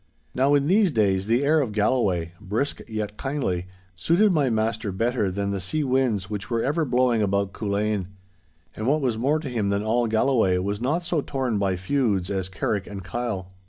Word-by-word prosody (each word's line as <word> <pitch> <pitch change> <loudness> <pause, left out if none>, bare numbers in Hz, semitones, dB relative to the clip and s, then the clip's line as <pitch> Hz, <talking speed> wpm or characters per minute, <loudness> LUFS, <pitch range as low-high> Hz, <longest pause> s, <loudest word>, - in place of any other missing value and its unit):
Now 135 +3 +3
in 140 -1 +2
these 195 +4 +4
days 100 - +1
the 120 +4 +2
air 155 +2 +4
of 120 -6 -3
Galloway, 105 -6 +1
brisk 110 +9 -2
yet 105 -1 -4
kindly, 130 -11 -2 0.3
suited 175 - +3
my 150 -6 +2
master 110 -1 -1
better 115 +1 0
than 100 +1 -2
the 100 - -2
sea 150 - -1
winds 125 -8 +1
which 105 +1 -5
were 115 -2 0
ever 155 +3 +1
blowing 125 -3 +2
about 100 -1 0
Culzean. 105 -2 -1 0.7
And 110 - -3
what 150 +3 +2
was 120 -5 0
more 140 +6 +2
to 155 -2 -5
him 115 -6 -1
than 100 +1 0
all 115 +2 +1
Galloway 110 -4 +2
was 100 +3 -2
not 155 +8 0
so 170 -3 0
torn 130 -7 -2
by 95 -2 +1
feuds 100 -2 0
as 95 -2 -2
Carrick 95 +1 -2
and 100 -2 -7
Kyle. 100 -3 -4
110 Hz, 195 wpm, -24 LUFS, 100-135 Hz, 0.7 s, these